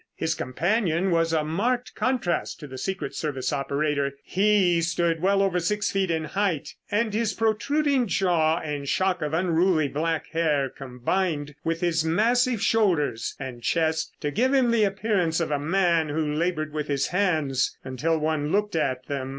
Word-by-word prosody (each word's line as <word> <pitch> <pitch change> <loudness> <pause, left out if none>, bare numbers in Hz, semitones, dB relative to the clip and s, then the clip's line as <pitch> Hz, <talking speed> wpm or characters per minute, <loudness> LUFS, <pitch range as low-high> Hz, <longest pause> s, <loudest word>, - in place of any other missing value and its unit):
His 160 0 -1
companion 175 - 0
was 165 -1 +2
a 160 -2 +1
marked 235 +11 -1
contrast 250 -9 -1
to 150 - -8
the 130 -2 -8
secret 185 -4 -3
service 140 -2 -2
operator. 140 0 -1
He 190 -3 +3
stood 165 -1 0
well 195 +1 +3
over 185 -2 +1
six 210 +4 -1
feet 195 -2 0
in 160 -1 0
height, 170 0 -1 0.2
and 215 +1 0
his 220 -2 0
protruding 260 +4 +1
jaw 170 -3 +2
and 145 -4 -4
shock 185 -1 +1
of 150 +1 -1
unruly 170 -2 +2
black 160 +3 -1
hair 150 -4 +1
combined 145 +4 -2
with 165 0 -2
his 170 -2 +1
massive 230 +7 +2
shoulders 175 - +1
and 130 -3 -7
chest 160 +3 0
to 145 - -1
give 255 - +2
him 250 -3 +3
the 225 -2 +3
appearance 195 -5 0
of 165 -3 -1
a 145 - +1
man 170 0 +1
who 150 0 -1
labored 155 -1 -1
with 150 -1 -3
his 140 -1 0
hands 155 -9 0
until 140 +6 -1
one 155 -1 -1
looked 210 0 0
at 130 -5 -1
them. 135 -1 -4
165 Hz, 165 wpm, -25 LUFS, 150-195 Hz, 0.2 s, He